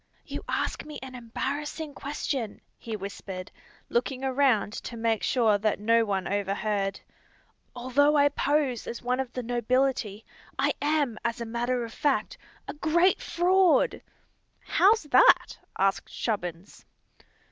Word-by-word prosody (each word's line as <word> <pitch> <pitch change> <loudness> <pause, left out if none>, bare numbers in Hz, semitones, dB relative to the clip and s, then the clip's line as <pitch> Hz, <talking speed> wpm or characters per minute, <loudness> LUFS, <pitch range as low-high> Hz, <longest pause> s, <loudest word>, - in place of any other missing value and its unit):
"You - - -6
ask - - -1
me 300 0 -8
an 260 -1 -8
embarrassing 285 +5 -4
question," 275 -6 -4 0.2
he 225 -2 -5
whispered, 195 -1 -7 0.4
looking 255 +2 -1
around 260 -6 +2
to 235 - -7
make 225 -1 0
sure 220 -5 +2
that 215 0 0
no 230 +2 +3
one 195 -3 -1
overheard. 200 0 -1 0.8
"Although 280 +5 +3
I 285 0 +5
pose 285 -4 0
as 235 - -6
one 250 +1 0
of 260 -2 -3
the 250 - -4
nobility, 245 -3 0 0.3
I - - +2
am, 290 -6 +1
as 235 0 -1
a 235 - -3
matter 240 +1 -1
of 230 - -10
fact, 285 -2 0 0.3
a - - -4
great 340 +5 +2
fraud!" 360 0 +3 0.6
"How's 430 +1 +3
that?" - - +5 0.2
asked 195 0 +1
Chubbins. 180 -4 -4
245 Hz, 135 wpm, -27 LUFS, 215-285 Hz, 0.8 s, I